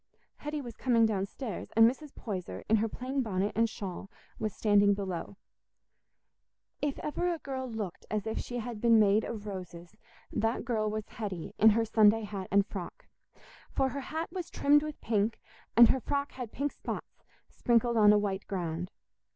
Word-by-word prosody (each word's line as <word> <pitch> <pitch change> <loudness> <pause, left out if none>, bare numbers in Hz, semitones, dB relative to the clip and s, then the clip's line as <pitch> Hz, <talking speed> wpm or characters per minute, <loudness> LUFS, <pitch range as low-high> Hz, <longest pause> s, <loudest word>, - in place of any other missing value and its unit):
Hetty 295 0 -4
was 240 -3 -8
coming 235 -3 +3
downstairs, 210 +1 -3
and 225 0 +8
Mrs. 275 +4 -3
Poyser, 190 -6 -5
in 220 - +4
her 225 +1 0
plain 260 +4 -2
bonnet 200 -3 -1
and 230 0 +3
shawl, 195 -2 -6 0.3
was 215 -1 -1
standing 205 -1 +4
below. 190 -1 -5 1.4
If 290 -2 -1
ever 350 +4 -1
a 340 - -2
girl 265 -3 -5
looked 215 -6 -5
as 210 -2 -2
if 220 - -2
she 245 - -5
had 235 -2 -5
been 230 -1 +6
made 210 +1 +4
of 215 -3 -5
roses, 180 -2 -8 0.4
that 225 +2 -1
girl 220 -3 0
was 215 0 -4
Hetty 195 -7 -6
in 220 - +8
her 225 +1 +2
Sunday 220 0 +4
hat 200 -3 -5
and 200 0 +4
frock. 190 -4 -7 0.6
For 265 - +1
her 280 +1 -4
hat 320 +5 -4
was 365 -3 -5
trimmed 290 +1 +4
with 305 0 -6
pink, 215 0 0 0.4
and 235 -1 +10
her 265 - +3
frock 280 +2 -2
had 250 -4 -7
pink 285 +1 -2
spots, - - -7 0.3
sprinkled 235 0 +2
on 210 -2 +7
a 210 - +6
white 200 -1 -2
ground. 175 -2 -3
220 Hz, 175 wpm, -30 LUFS, 200-250 Hz, 1.4 s, and